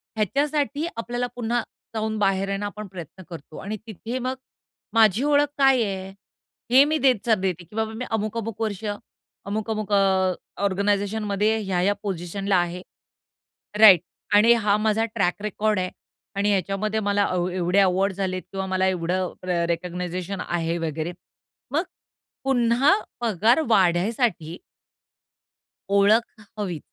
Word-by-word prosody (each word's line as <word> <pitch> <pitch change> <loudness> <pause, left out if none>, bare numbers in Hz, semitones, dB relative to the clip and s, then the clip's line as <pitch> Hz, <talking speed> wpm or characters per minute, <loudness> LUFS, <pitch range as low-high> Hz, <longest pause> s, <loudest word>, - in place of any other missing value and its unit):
ह्याच्यासाठी 285 - 0
आपल्याला 245 +2 -2
पुन्हा 240 0 0 0.3
जाऊन 220 0 -1
बाहेर 195 -1 +1
आहे 195 - -1
ना, 205 - -4
आपण 205 0 -6
प्रयत्न 185 0 -10
करतो. 160 -2 -10
आणि 215 +2 -5
तिथे 225 +4 -5
मग 255 +1 -2 0.6
माझी 220 +2 +4
ओळख 290 0 +3
काय 270 -3 +5
आहे? 190 -2 -4 0.6
हे 260 +2 +8
मी 310 +1 +1
देत 260 -3 +4
जाते 195 -5 +2
की 175 - -13
बाबा 220 0 -1
मी 250 +3 -5
अमुक, 215 +1 -1
अमुक 225 -1 -5
वर्ष 215 -2 -2 0.6
अमुक, 215 +2 -3
अमुक 215 -1 -3
अ, 190 -2 +3 0.3
ऑर्गनायझेशनमध्ये 205 +2 +1
ह्या-ह्या 190 +1 +1
पोझिशनला 195 +1 -1
आहे. 175 +1 -1 1.0
राइट. 195 -6 +9 0.3
आणि 215 +3 +7
हा 210 -3 +2
माझा 220 +1 +2
ट्रॅक 195 -2 0
रेकॉर्ड 210 -1 0
आहे 185 - -1 0.5
आणि 200 +1 +1
ह्याच्यामध्ये 200 +3 0
मला 205 -1 +1 0.3
ए 180 - -6
एवढे 180 +2 +2
अवॉर्ड्स 190 0 +2
झालेत 185 -1 -2
किंवा 195 0 -3
मला 190 0 +1
एवढं 180 0 -1
र 175 -2 0
रिकॉगनायझेशन 180 +2 -3
आहे 170 -1 -1
वगैरे. 160 0 -3 0.6
मग 315 - +2 0.6
पुन्हा 250 +4 +3 0.3
पगार 225 - +3
वाढण्यासाठी 185 - +1 1.3
ओळख 210 +2 +3 0.2
हवी. 180 -7 -3
200 Hz, 135 wpm, -24 LUFS, 185-225 Hz, 1.3 s, राइट